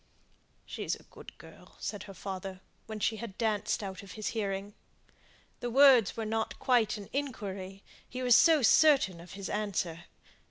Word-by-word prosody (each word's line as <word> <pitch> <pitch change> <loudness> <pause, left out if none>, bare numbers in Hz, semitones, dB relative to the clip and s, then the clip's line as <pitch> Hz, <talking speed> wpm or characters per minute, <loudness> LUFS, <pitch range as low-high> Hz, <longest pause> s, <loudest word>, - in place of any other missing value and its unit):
"She's - - -3
a - - -17
good - - -14
girl," - - -16
said 205 -2 -4
her 195 - -10
father, 190 -1 -6 0.3
when 220 -1 -6
she 220 +1 0
had 215 -3 -8
danced 215 -2 0
out 190 -1 -6
of 200 -2 -11
hearing. 205 -2 -3 0.9
The 245 - -3
words 255 -5 +6
were 225 - -2
not 220 +1 -2
quite 240 -4 +2
an 200 -2 -9
inquiry, 200 -8 -5 0.3
he 255 0 -5
was 245 -2 +6
so 320 -5 +6
certain 265 - +5
of 175 - -12
his 195 0 -6
answer. 180 -5 -3
210 Hz, 160 wpm, -30 LUFS, 195-235 Hz, 0.9 s, words